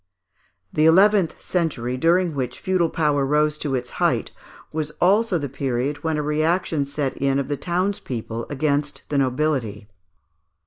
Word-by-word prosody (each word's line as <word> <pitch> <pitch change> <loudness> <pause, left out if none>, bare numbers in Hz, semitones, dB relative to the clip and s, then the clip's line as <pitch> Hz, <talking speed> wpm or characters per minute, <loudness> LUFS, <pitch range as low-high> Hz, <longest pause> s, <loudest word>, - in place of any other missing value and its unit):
] - - -42
The 155 +1 +4
eleventh 190 +1 +4
century, 140 -9 -1
during 170 +4 +2
which 125 -3 -3
feudal 185 -3 +1
power 150 -3 +1
rose 150 +2 +2
to 140 -3 -1
its 125 -1 -4
height, - - +1 0.4
was 155 -1 -2
also 200 +1 +3
the 145 -3 -3
period 135 +2 -2
when 160 -1 0
a 150 - -1
reaction 155 0 0
set 140 -1 -3
in 135 0 +1
of 140 0 -2
the 145 - 0
townspeople 145 - -3
against 145 0 -1
the 145 - +1
nobility. 130 -6 -1
150 Hz, 150 wpm, -22 LUFS, 135-165 Hz, 0.4 s, The